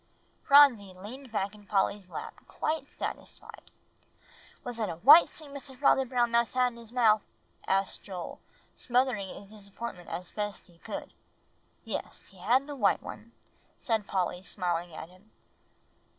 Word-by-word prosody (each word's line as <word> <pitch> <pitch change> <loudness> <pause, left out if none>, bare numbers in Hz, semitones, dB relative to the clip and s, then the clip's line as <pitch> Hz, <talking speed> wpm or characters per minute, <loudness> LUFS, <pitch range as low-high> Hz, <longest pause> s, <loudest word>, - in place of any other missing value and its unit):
Phronsie 250 -10 +6
leaned 235 +7 -10
back 200 -2 -1
in 205 -1 -16
Polly's 195 -1 0
lap - - -6
quite 310 -2 -3
satisfied. - - -7 0.9
"Was 245 -1 -6
it 215 - 0
a 165 - -4
white 285 - +8
stick 305 -2 -11
Mr. 275 -2 -8
Father 270 -1 +4
Brown 240 -2 +1
Mouse 235 0 +2
had 250 -1 +3
in - - -14
his 230 -1 -10
mouth?" 220 -4 +4 0.5
asked 195 0 0
Joel, 185 -4 -7 0.4
smothering 245 -5 +1
his 200 +2 -10
disappointment 200 -3 -8
as 180 0 -5
best 205 -1 -4
he 170 -2 -19
could. - - -7 0.7
"Yes, - - -6
he 195 - -18
had 245 +9 +3
the 290 0 -6
white 210 -7 +2
one," 230 +2 -9 0.5
said 220 -5 -1
Polly, 180 -2 -1
smiling 175 -2 -2
at 160 - -8
him. 185 +4 -21
215 Hz, 150 wpm, -29 LUFS, 190-250 Hz, 0.9 s, white